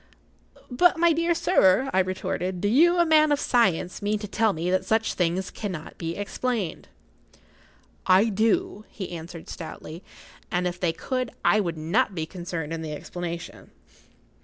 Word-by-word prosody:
"But, 350 +8 +4
my 340 0 +4
dear 335 +2 +1
sir," 270 - +3
I 190 - +3
retorted, 185 -1 -2
"do 205 - 0
you, 335 +11 +5
a 345 - +4
man 310 -1 +5
of 290 - +2
science, 195 - +1
mean 205 +1 0
to 210 0 -6
tell 220 +1 +2
me 170 +1 -2
that 185 - +1
such 220 0 +1
things 180 +1 -1
cannot 180 -7 -6
be 165 0 -3
explained?" 205 -2 -3 1.2
"I 190 +5 +5
do," 215 0 0
he 190 -4 -7
answered, 165 0 -8
stoutly. 160 0 -8 0.5
"And, 180 0 -1
if 175 0 -3
they 175 -3 +1
could, 255 +8 -3 0.2
I 215 - +5
would 170 -5 -2
not 190 +7 0
be 160 -2 -2
concerned 170 -2 -5
in 165 - -4
the 155 -1 -5
explanation." 170 +2 -7
190 Hz, 160 wpm, -25 LUFS, 170-235 Hz, 1.2 s, you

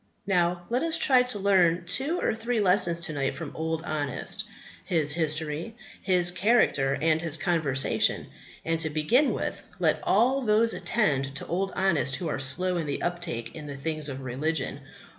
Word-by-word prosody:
Now, 175 -2 +1
let 245 +2 0
us 330 0 +1
try 265 -5 +4
to 250 -4 -2
learn 180 -4 +3
two 275 - +2
or - - 0
three 225 +1 -2
lessons 180 -4 +3
to 160 -2 -2
night 140 -2 -1
from 160 -4 -7
Old 160 0 -3
Honest, 145 -5 -3 0.4
his 155 -4 0
history, 155 +5 -2 0.3
his 180 -2 +2
character, 180 - +2
and 160 0 +2
his 165 -2 0
conversation. 160 -6 +1 0.4
And, 165 0 0
to 160 -1 +1
begin 155 - +2
with, - - -3 0.2
let - - +1
all 255 +6 +2
those 225 -1 +3
attend 140 - 0
to - - -4
Old 190 +3 -2
Honest 170 -8 +1
who 175 - -4
are 140 - -2
slow 175 +8 0
in 165 -3 -3
the 140 - -3
uptake 170 -10 -3
in 150 -2 -8
the 140 -1 -7
things 155 +1 -3
of 135 -1 -6
religion. 135 +4 -2
170 Hz, 175 wpm, -27 LUFS, 150-195 Hz, 0.4 s, try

